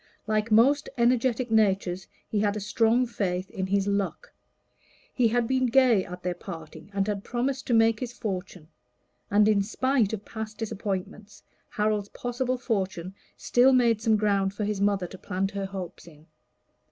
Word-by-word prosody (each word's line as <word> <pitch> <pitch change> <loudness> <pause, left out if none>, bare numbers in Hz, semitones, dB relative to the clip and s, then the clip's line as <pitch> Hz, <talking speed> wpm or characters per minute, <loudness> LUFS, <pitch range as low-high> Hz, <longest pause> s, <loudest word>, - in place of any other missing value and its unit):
Like 215 +1 0
most 270 +7 +4
energetic 240 0 +2
natures, 195 -4 +1 0.2
he 210 - -1
had 205 0 +1
a - - -2
strong 225 +4 +2
faith 185 -5 -3
in 190 -1 -3
his 195 0 +1
luck; 200 -1 -2 0.8
he 245 -3 +3
had 235 +1 +1
been 260 0 +2
gay 240 -5 +4
at 180 +1 -9
their 180 0 -1
parting, 165 -1 -10
and 195 -1 0
had 205 -1 -2
promised 260 +3 -2
to 240 - +2
make 225 -1 +4
his 245 -2 -4
fortune; 190 -7 -5 0.6
and 210 +1 +4
in 210 -2 +4
spite 235 +1 +1
of 210 -2 -5
past 220 -1 -7
disappointments, 210 -1 -5 0.3
Harold's 210 -1 -1
possible 250 +1 -2
fortune 190 -7 -2 0.2
still 255 +2 +4
made 235 -4 +3
some 225 -2 +3
ground 200 -2 +1
for 210 - -3
his 205 -1 -2
mother 200 -2 +2
to 185 +1 -10
plant 195 0 -2
her 200 -1 -3
hopes 190 -3 -8
in. 155 -2 -16
210 Hz, 165 wpm, -27 LUFS, 195-235 Hz, 0.8 s, most